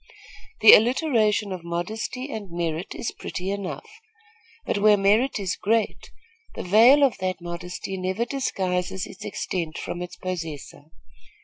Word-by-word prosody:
The 220 - +10
alliteration 225 -4 +3
of 185 -2 -6
modesty 215 +10 -4
and 210 -5 -6
merit 170 0 -3
is - - -3
pretty 185 +1 -5
enough; 200 -2 -5 0.8
but - - -1
where 210 0 +5
merit 215 +8 +2
is 195 -4 -2
great, 225 +1 -1 0.5
the - - -5
veil 230 +10 +6
of 255 -8 +2
that 185 -1 -2
modesty 180 +2 -6
never 190 +5 -1
disguises 190 -8 -2
its - - -11
extent 165 -4 -4
from 175 - -5
its 180 0 -7
possessor. 165 -6 -6
190 Hz, 135 wpm, -24 LUFS, 180-220 Hz, 0.8 s, The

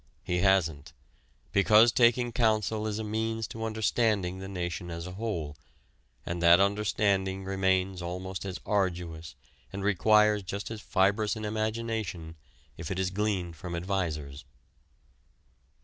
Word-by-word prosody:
He 90 0 -1
hasn't, 85 -6 +1 0.6
because 105 +4 +6
taking 120 0 +3
counsel 110 -2 +1
is 105 -1 -2
a 110 - -3
means 110 +1 -2
to 115 0 -5
understanding 110 -4 0
the 95 - -7
nation 90 -2 -4
as 85 0 -6
a 90 - -6
whole, 90 -8 -4 0.7
and 85 0 -3
that 85 +1 +7
understanding 100 -1 +1
remains 95 -1 0
almost 90 +2 -5
as 95 -1 -5
arduous 90 -5 -2 0.4
and 95 0 -5
requires 105 +2 +4
just 100 +3 -5
as 110 -1 -6
fibrous 105 +1 +1
an 110 -1 -5
imagination, 110 -6 -3 0.4
if 80 - -6
it 95 - -3
is 95 -1 -1
gleaned 95 -4 -1
from 85 +2 -6
advisers. 80 -6 -3
95 Hz, 135 wpm, -29 LUFS, 90-110 Hz, 0.7 s, that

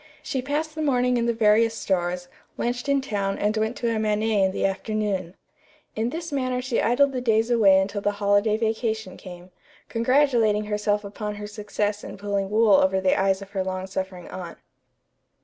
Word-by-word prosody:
She 265 - -2
passed 300 +4 -2
the 315 - -5
morning 250 -4 +2
in 235 0 0
the - - +3
various 225 +1 +3
stores, 180 -2 -1 0.3
lunched 245 +3 -2
in 280 -1 +3
town 200 -6 -2
and 210 +1 0
went 220 +2 -1
to 230 -2 -1
a - - -1
matinée 215 -1 +1
in 190 - +2
the - - -1
afternoon. 195 -2 -2 0.6
In 225 +2 0
this 330 +4 -5
manner 255 -3 -1
she 250 -1 -1
idled 270 +4 +3
the 255 -2 -3
days 225 0 +2
away 200 -5 +5
until 200 +1 -2
the 205 +1 0
holiday 205 +1 +2
vacation 220 -3 -2
came, 180 0 -11 0.4
congratulating 230 -4 +2
herself 210 0 0
upon 210 +1 -5
her 210 0 -7
success 210 0 -3
in - - -8
pulling 200 -1 -2
wool 215 0 +4
over 190 0 +3
the 190 -1 +2
eyes 195 0 +1
of 195 - -15
her 195 -2 -1
long 185 0 -4
suffering 190 -2 -5
aunt. 180 -2 -8
210 Hz, 185 wpm, -24 LUFS, 195-235 Hz, 0.6 s, away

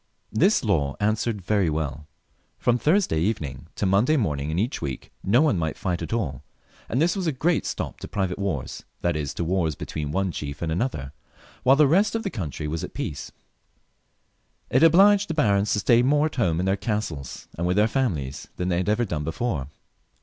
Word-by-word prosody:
This - - +3
law 70 -1 +1
answered 105 0 0
very 100 -2 +2
well. 75 -1 -3 0.5
From 120 0 +1
Thursday 165 - +2
even 95 -1 0
ing 65 +3 -10
to - - -1
Monday 105 +11 +3
morning 75 - -1
in 80 - -2
each 115 +8 -1
week 65 -2 -5
no 120 +9 +4
one 140 - +2
might 80 -1 -2
fight 90 -4 -2
at 80 - -5
all, 85 - -2 0.5
and 125 - 0
this 170 +5 +2
was 190 -3 -2
a - - +3
great 155 +5 0
stop - - -4
to - - -7
private 95 -2 -2
wars, 95 -10 -3 0.2
that 85 -2 +1
is 75 -3 -2
to - - -2
wars 85 -3 0
between 75 +1 -4
one 95 +3 0
chief 70 -1 -5
and 80 - -1
another, 80 - -2 0.5
while 135 - +5
the 150 +1 +5
rest 195 +10 +3
of 225 - -1
the 195 - -3
country 75 - -4
was 80 +1 -3
at - - -7
peace. - - -5 1.4
It 130 - +4
obliged 195 +5 +6
the 165 - -2
barons 100 -7 +2
to - - +1
stay 120 +2 +5
more 145 +4 +3
at 155 - -3
home 85 -9 +1
in 90 - 0
their 95 +1 +2
castles 100 - -4
and 85 +2 -1
with 90 +2 +1
their 105 +1 +5
families 85 - -2
than 90 0 -2
they 85 - +1
had 90 +3 0
ever 115 +3 +2
done 75 -7 -3
before. 80 - -2
95 Hz, 210 wpm, -25 LUFS, 80-125 Hz, 1.4 s, obliged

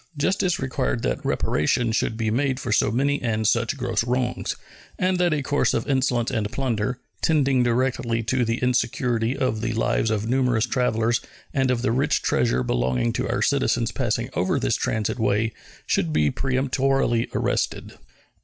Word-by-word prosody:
Justice 185 +3 +1
required 130 -2 -2
that - - -1
reparation 115 - +1
should 110 0 0
be 110 -1 0
made 130 +2 0
for 120 - -4
so 105 - +3
many 140 +4 +1
and 110 -2 0
such 115 +4 +1
gross 125 -3 0
wrongs, 125 +1 -1 0.4
and 185 0 +1
that 175 -1 +3
a 150 -2 0
course 145 +2 +1
of - - -2
insolence 130 -4 +1
and 110 -4 -2
plunder, 125 -2 -1 0.2
tending 140 -5 +3
directly 120 -1 0
to 125 +3 +1
the 115 0 0
insecurity 120 -1 0
of 110 -4 -1
the 115 0 -1
lives 110 0 +1
of 110 0 -1
numerous 125 -2 +2
travelers 120 -2 +1 0.3
and 130 -1 +1
of 125 -1 0
the 130 - +2
rich 130 +5 +1
treasure 60 +1 +1
belonging - - 0
to - - -2
our - - 0
citizens - - +1
passing - - -2
over - - 0
this - - +1
transit 110 +2 -1
way, 110 +1 +1 0.3
should 80 - 0
be 75 -1 +2
peremptorily 130 -2 0
arrested. - - -1
120 Hz, 165 wpm, -24 LUFS, 110-130 Hz, 0.4 s, so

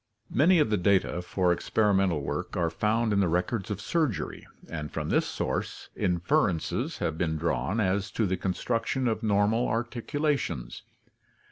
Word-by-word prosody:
— 110 - -43
Many 180 +2 +6
of 150 -9 +3
the 105 - +3
data 95 -2 +2
for 90 0 +1
experimental 95 -4 +1
work - - -3
are 85 -2 +1
found 110 +5 +1
in 100 - +2
the 95 - +3
records 90 +5 -1
of 105 -2 -3
surgery, 150 - -2 0.2
and 75 -2 -5
from - - -3
this - - +2
source - - -3
inferences 90 - 0
have 80 0 -2
been 80 -3 0
drawn 85 +6 -1
as 100 0 +1
to 110 - +1
the 95 -1 0
construction 115 +7 -1
of 110 -1 0
normal 105 +2 +2
ar 115 +2 +1
ticulations. 135 - -2
100 Hz, 160 wpm, -28 LUFS, 90-115 Hz, 0.2 s, Many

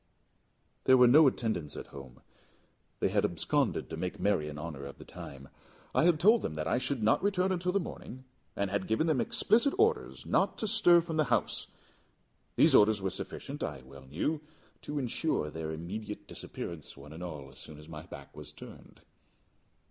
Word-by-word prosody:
There 130 - +7
were 125 - +7
no 150 +5 +7
attendants 110 - -2
at - - -6
home; 65 -3 -11 0.8
they - - +2
had - - +1
absconded - - 0
to - - -3
make 90 - -4
merry 95 -7 +1
in 75 - -8
honour 75 -2 -6
of 70 - -9
the - - -12
time. 70 0 -10 0.5
I - - +3
had 170 -3 +4
told 215 +6 +5
them 80 - -4
that 75 +1 -3
I 120 - +1
should 130 -2 -2
not 110 - +3
return 190 -2 +1
until 180 0 0
the 200 - +2
morning, 130 -7 -8 0.3
and 100 -1 -1
had 100 -2 -1
given 110 +8 +1
them 155 -7 +2
explicit 240 +6 +3
orders 440 +2 +1
not - - +1
to 220 - -2
stir 175 -5 +6
from 165 -1 -4
the 155 - +3
house. - - 0 0.9
These - - +5
orders 105 0 +6
were 95 -1 -2
sufficient, - - -7
I 70 -3 -4
well 65 0 -14
knew, 145 - -2 0.4
to 150 - -5
insure 125 - -1
their 80 0 -5
immediate 100 +7 -6
disappearance, 85 -5 -7
one 75 +2 -11
and 80 - -9
all, 75 -6 -7
as 65 - -13
soon 75 - -10
as 75 +1 -13
my 75 -2 -8
back 70 -6 -11
was - - -10
turned. - - -13
105 Hz, 190 wpm, -31 LUFS, -, 0.9 s, There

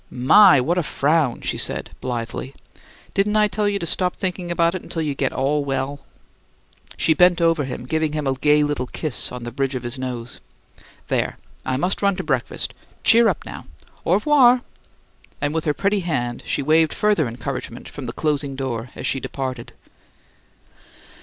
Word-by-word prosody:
"My, 160 +6 +6
what 170 +8 +1
a - - +2
frown!" 150 -4 +1
she - - -3
cried, - - -1
blithely. 125 +2 -4 0.6
"Didn't 205 +2 +1
I 210 0 +5
tell 205 0 0
you 200 - 0
to 175 - -4
stop 180 +2 0
thinking 180 -2 -3
about 170 0 +2
it 185 - -6
till 165 - -2
you 150 -2 -1
get 135 -1 -1
ALL 145 +2 0
well?" 140 +1 -2 1.0
She 160 - +3
bent 180 +1 +4
over 165 -3 +2
him, 125 -1 -6
giving 155 +2 -1
him 150 -1 -2
a 135 - +1
gay 150 +2 +3
little 145 -4 -1
kiss 155 -1 -2
on 125 -1 -7
the 120 - -5
bridge 135 +2 -2
of 125 - -4
his 120 +2 -4
nose. 125 -2 -5 0.7
"There! - - -1 0.3
I 130 - -1
must 180 +6 -1
run 200 -1 +2
to - - -4
breakfast. - - -1 0.3
Cheer 230 0 +6
up - - -1
now! - - -8 0.4
Au - - +3
'voir!" 255 -5 +5 0.8
And 145 0 -1
with 160 -1 -2
her 150 - +2
pretty 200 +1 +1
hand 125 -9 -2
she - - -1
waved 155 +2 +3
further 205 -9 +2
encouragement 125 0 -6
from 140 -4 -8
the 120 - -5
closing 145 -3 -1
door 125 -3 -4
as - - -6
she 135 - +1
departed. 130 -3 -5
150 Hz, 180 wpm, -22 LUFS, 130-175 Hz, 1.0 s, My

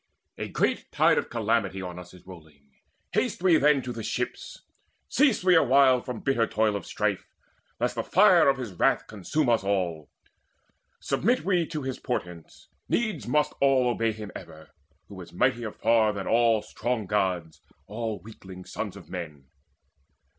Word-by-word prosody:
A - - -3
great - - -1
tide - - +3
of - - -6
calamity 110 -4 -1
On 90 -1 -6
us 90 0 -12
is 90 - -17
rolling; 75 -6 -15 0.4
haste - - -1
we 175 -4 +5
then 145 -2 +3
to 125 - -5
the 115 - -6
ships; - - -5 0.4
Cease 270 -7 +2
we 185 -1 +5
awhile 135 -4 +5
from 125 -3 -6
bitter 120 -5 +1
toil 110 -1 +1
of 100 - -5
strife, - - -2 0.5
Lest - - 0
the - - -2
fire - - +5
of 135 - +1
his 120 -7 -6
wrath 85 - +1
consume 115 - -2
us 115 -4 +2
all. 90 -6 -2 0.9
Submit 245 +6 0
we 180 -4 +1
to 155 -3 -5
his 130 -1 -4
portents; 90 -9 -6 0.2
needs 215 - -1
must 150 +4 +1
all 135 -3 +4
Obey 115 -1 0
him 105 -1 -8
ever, 80 0 -11 0.4
who 95 -2 -10
is 85 - -12
mightier 120 +2 0
far 110 -1 +2
Than 100 -2 -5
all 115 -2 +3
strong 120 0 -3
Gods, 90 -5 -2 0.2
all 110 +1 -4
weakling 95 -4 -12
sons - - -5
of - - -12
men. 80 -6 -7
110 Hz, 165 wpm, -26 LUFS, 95-130 Hz, 0.9 s, we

